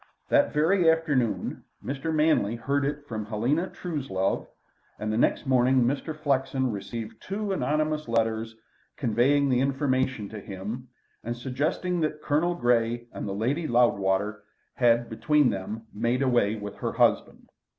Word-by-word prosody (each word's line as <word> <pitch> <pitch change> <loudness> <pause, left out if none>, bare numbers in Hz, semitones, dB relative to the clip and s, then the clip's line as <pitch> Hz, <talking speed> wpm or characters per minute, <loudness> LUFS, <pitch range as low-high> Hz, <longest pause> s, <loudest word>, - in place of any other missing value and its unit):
That 285 -1 +4
very 165 +3 +3
afternoon 145 -8 0 0.2
Mr. 140 +4 -3
Manley 155 -9 +2
heard 140 +4 0
it 145 +1 -3
from 110 -4 -4
Helena 125 - 0
Truslove, 135 - -2 0.5
and 110 0 -2
the - - 0
next - - +2
morning 130 -1 +4
Mr. 140 +5 -1
Flexen 135 -3 0
received 110 +2 -6
two 200 +1 -3
anonymous 155 -4 0
letters 115 -1 0 0.4
conveying 135 +4 +2
the 125 -2 +2
information 130 -4 0
to 110 - -7
him, 105 +6 -6 0.4
and 120 +1 -4
suggesting 155 +8 -1
that 155 -1 -1
Colonel 165 +4 +1
Grey 120 -3 +1
and - - -5
the 100 - -3
Lady 140 +10 -1
Loudwater 105 -3 +2 0.3
had 120 -1 +3
between 125 +4 +2
them 105 +3 -5
made 120 +5 0
away 120 -5 +2
with 105 -2 -7
her - - -3
husband. - - +1
125 Hz, 140 wpm, -27 LUFS, 115-150 Hz, 0.5 s, That